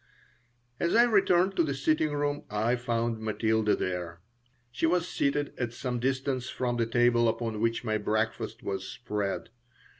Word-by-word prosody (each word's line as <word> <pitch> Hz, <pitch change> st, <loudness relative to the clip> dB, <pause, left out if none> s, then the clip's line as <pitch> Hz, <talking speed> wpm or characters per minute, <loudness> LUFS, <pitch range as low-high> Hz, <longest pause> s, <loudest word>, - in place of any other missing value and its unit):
As 170 Hz, -, +1 dB
I 235 Hz, -, +7 dB
returned 195 Hz, -4 st, +3 dB
to -, -, +5 dB
the 140 Hz, -3 st, -1 dB
sitting 155 Hz, +2 st, +1 dB
room 145 Hz, 0 st, -1 dB
I 110 Hz, +4 st, +1 dB
found 115 Hz, -2 st, -1 dB
Matilda 110 Hz, 0 st, +1 dB
there. 90 Hz, -2 st, -3 dB, 0.5 s
She 160 Hz, -, 0 dB
was 175 Hz, +1 st, +1 dB
seated 145 Hz, -2 st, 0 dB
at 120 Hz, -2 st, -2 dB
some 125 Hz, 0 st, -3 dB
distance 130 Hz, 0 st, -1 dB
from 120 Hz, -1 st, -2 dB
the 115 Hz, -1 st, +1 dB
table 120 Hz, 0 st, +3 dB
upon 110 Hz, -2 st, -2 dB
which 115 Hz, +1 st, 0 dB
my 110 Hz, -2 st, 0 dB
breakfast 110 Hz, +2 st, -2 dB
was 95 Hz, -1 st, -3 dB
spread. 105 Hz, -4 st, -3 dB
120 Hz, 155 wpm, -29 LUFS, 110-145 Hz, 0.5 s, I